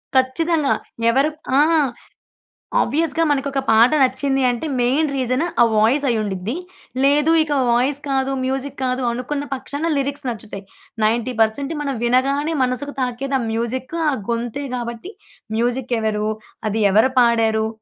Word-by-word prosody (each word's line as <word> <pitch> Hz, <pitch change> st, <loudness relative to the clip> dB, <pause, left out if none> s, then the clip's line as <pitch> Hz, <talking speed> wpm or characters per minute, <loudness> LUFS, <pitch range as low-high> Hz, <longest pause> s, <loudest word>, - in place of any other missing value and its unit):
ఖచ్చితంగా! 295 Hz, +4 st, +2 dB, 0.4 s
ఎవరు 270 Hz, +5 st, +3 dB, 0.3 s
ఆ! -, -, +7 dB, 1.2 s
ఆబ్వియస్‌గా 320 Hz, +4 st, +1 dB
మనకొక 275 Hz, -1 st, 0 dB
పాట 225 Hz, +3 st, +6 dB
నచ్చింది 270 Hz, +1 st, +1 dB
అంటే, 240 Hz, +4 st, -2 dB
మెయిన్ 275 Hz, +5 st, +2 dB
రీజను, 255 Hz, +4 st, 0 dB, 0.2 s
ఆ -, -, +9 dB
వాయిస్ 235 Hz, +7 st, +3 dB
అయ్యుండిద్ది. 210 Hz, 0 st, -2 dB, 0.5 s
లేదు 295 Hz, +3 st, +4 dB
ఇక 305 Hz, -, -6 dB, 0.2 s
వాయిస్ 260 Hz, +4 st, +2 dB
కాదు 270 Hz, 0 st, 0 dB
మ్యూజిక్ 270 Hz, +1 st, -3 dB
కాదు, 255 Hz, 0 st, -1 dB
అనుకున్న 265 Hz, +4 st, -3 dB
పక్షాన 285 Hz, +5 st, -3 dB
లిరిక్స్ 280 Hz, -1 st, -2 dB
నచ్చుతాయి. 210 Hz, -3 st, -7 dB, 0.4 s
90% 235 Hz, +5 st, 0 dB
మనం 275 Hz, -2 st, -2 dB
వినగానే 275 Hz, +6 st, +1 dB
మనసుకు 255 Hz, +3 st, -2 dB
తాకేది 265 Hz, +2 st, -1 dB
ఆ -, -, -2 dB
మ్యూజిక్, 245 Hz, +6 st, -3 dB, 0.2 s
ఆ -, -, -1 dB, 0.2 s
గొంతే 235 Hz, +4 st, -2 dB
కాబట్టి, 240 Hz, -, -6 dB, 0.5 s
మ్యూజిక్ 245 Hz, +1 st, -1 dB
ఎవరు? 215 Hz, -1 st, -1 dB, 0.4 s
అది 220 Hz, +2 st, -1 dB
ఎవరు 220 Hz, +6 st, +4 dB
పాడారు? 225 Hz, -2 st, +3 dB
255 Hz, 130 wpm, -20 LUFS, 235-280 Hz, 1.2 s, ఆ